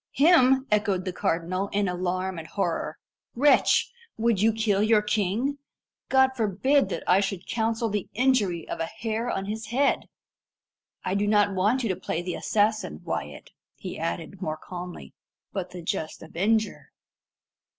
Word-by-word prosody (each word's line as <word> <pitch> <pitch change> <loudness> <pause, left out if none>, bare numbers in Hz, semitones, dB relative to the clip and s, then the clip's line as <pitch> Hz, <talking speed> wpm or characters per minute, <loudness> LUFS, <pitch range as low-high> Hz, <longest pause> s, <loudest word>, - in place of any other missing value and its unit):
"Him!" 270 -4 +5
echoed 200 -3 +1
the 185 - -3
cardinal, 180 +4 -1
in 200 0 0
alarm 180 0 -2
and 160 - -8
horror. 165 -3 -2 0.4
"Wretch! 285 +4 +4 0.3
would 225 -3 +2
you 225 +1 +5
kill 215 -2 +1
your 215 0 +4
king? 215 +7 0 0.5
God 265 0 +5
forbid 245 +6 +2
that - - -4
I 180 +2 +5
should 195 -2 -2
counsel 225 0 0
the 205 -3 -3
injury 215 -9 +2
of - - -5
a 165 - -1
hair 225 +3 -3
of 195 -3 -2
his 220 +2 -5
head! 270 +5 +1 1.0
I 185 - 0
do 200 +1 +1
not 205 -1 +3
want 210 +8 +2
you 230 - 0
to 185 - +1
play 175 -2 -3
the 180 0 -3
assassin, 210 - 0
Wyat," 70 0 -5 0.2
he - - -7
added 130 - -4
more 155 -4 -2
calmly, 175 - -8 0.4
"but 185 -2 -3
the 180 -1 -9
just 160 -1 -3
avenger. 210 +7 0
205 Hz, 155 wpm, -26 LUFS, 180-225 Hz, 1.0 s, Him